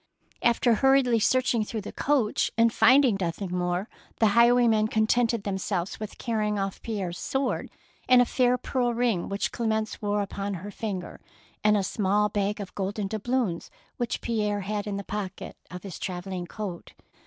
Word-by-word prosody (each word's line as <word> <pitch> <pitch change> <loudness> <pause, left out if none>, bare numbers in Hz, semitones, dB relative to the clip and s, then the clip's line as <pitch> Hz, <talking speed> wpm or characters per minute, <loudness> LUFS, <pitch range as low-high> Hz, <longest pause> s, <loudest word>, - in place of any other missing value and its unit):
After 235 0 +3
hurriedly 260 0 +4
searching 245 0 +2
through 220 +1 -4
the 205 - -7
coach 265 -7 +1
and 230 0 +4
finding 260 -5 +5
nothing 180 +1 -3
more, 180 +2 -1 0.3
the 220 - +5
highwaymen 235 -1 +4
contented 225 0 +1
themselves 190 -2 -2
with 215 -1 -7
carrying 215 -3 -1
off 195 -1 -3
Pierre's 190 -6 -4
sword 265 +4 -2 0.4
and 255 -1 +8
a 245 - +6
fair 250 0 +2
pearl 245 -2 -1
ring 230 -7 0
which 200 0 -1
Clemence 220 -2 -2
wore 205 -1 0
upon 200 0 -4
her 195 +4 -7
finger, 195 -4 -5 0.4
and 210 0 +4
a 200 - 0
small 205 +1 +1
bag 205 0 -1
of 200 -2 -7
golden 200 +1 -2
doubloons 220 -2 -2 0.3
which 240 -1 -2
Pierre 210 -3 -1
had 205 +1 -3
in 200 -1 -2
the 200 - -4
pocket 200 -2 -5
of 180 0 -8
his 195 -5 -7
travelling 180 -1 -4
coat. 195 -5 -7
210 Hz, 165 wpm, -27 LUFS, 195-235 Hz, 0.4 s, and